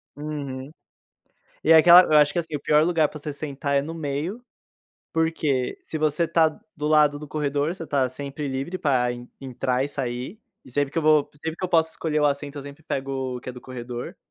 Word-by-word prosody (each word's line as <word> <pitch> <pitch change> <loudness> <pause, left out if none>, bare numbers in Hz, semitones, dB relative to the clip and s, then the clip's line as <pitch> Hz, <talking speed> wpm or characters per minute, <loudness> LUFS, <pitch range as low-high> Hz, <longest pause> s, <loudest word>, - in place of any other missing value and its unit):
Uhum. 145 -2 -6 0.9
E 160 - +3
aquela 170 +3 +9
eu 155 -3 +4
acho 150 0 +5
que, 175 - +1
assim, 160 -2 -4
o 145 - -3
pior 150 +1 +4
lugar 165 -3 +3
pra 150 - -10
você 150 +1 -5
sentar 140 -1 -3
é - - +2
no 155 +4 -6
meio, 160 - -4 0.7
porque 155 -6 0
se 160 - -6
você 155 +2 +1
tá 160 -1 +4 0.3
do 150 -1 -3
lado 150 -1 +4
do 150 - -8
corredor, 145 +2 -1
você 165 -4 -8
tá 135 -3 +1
sempre 140 +2 -5
livre 135 +7 -3
pra 130 -7 +1
en 120 0 -9
entrar 130 0 -1
e - - -4
sair. 130 - -4 0.2
E - - -14
sempre 145 0 0
que 165 - -1
eu - - 0
vou 155 -1 +4
sempre 160 +2 -5
que 185 - -5
eu - - -1
posso 160 -2 +3
escolher 155 -1 -1
o 150 - +4
assento, 145 0 -2
eu 140 - -6
sempre 145 +2 -11
pego 135 -3 -3
o - - -7
que 130 - -10
é - - -4
do 125 - -11
corredor. 120 -1 -7
145 Hz, 220 wpm, -24 LUFS, 135-160 Hz, 0.9 s, aquela